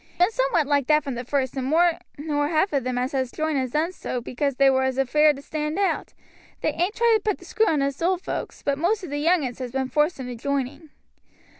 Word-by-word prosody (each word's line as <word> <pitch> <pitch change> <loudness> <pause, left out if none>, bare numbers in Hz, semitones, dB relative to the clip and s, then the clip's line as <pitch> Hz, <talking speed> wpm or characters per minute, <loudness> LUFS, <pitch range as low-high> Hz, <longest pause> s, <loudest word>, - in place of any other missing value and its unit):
It's - - -29
been 355 +5 +4
somewhat 345 -11 +2
like 285 -2 +1
that 305 -1 +4
from 275 - -4
the 245 +1 -4
first, 260 0 -1
and 260 -1 -2
more 340 +3 +3 0.2
nor 290 0 -1
half 315 +3 +1
of 275 -3 +1
them 255 0 -2
as 250 +1 -1
has 260 -3 -1
joined 310 -2 -1
has 260 -1 -1
done 310 +7 0
so 255 -8 -4
because 255 +3 -2
they 275 +1 +4
was 265 0 +1
afeared 300 +3 +4
to 280 - -11
stand 305 +2 -3
out. 395 -1 -1 0.5
They - - 0
ain't 360 +5 -1
tried 465 -1 +4
to - - -10
put 420 -2 0
the - - -15
screw 440 0 +1
on 295 -3 +2
us 280 +1 -2
old 365 +2 0
hands, - - -5
but 280 -1 0
most 390 +5 +1
of 350 - -7
the 290 - -2
young 330 0 +3
uns 245 -1 -5
has 250 -2 -5
been 265 0 -2
forced 300 +2 +1
into 250 -1 -5
joining. 280 +4 -3
290 Hz, 255 wpm, -24 LUFS, 265-330 Hz, 0.5 s, been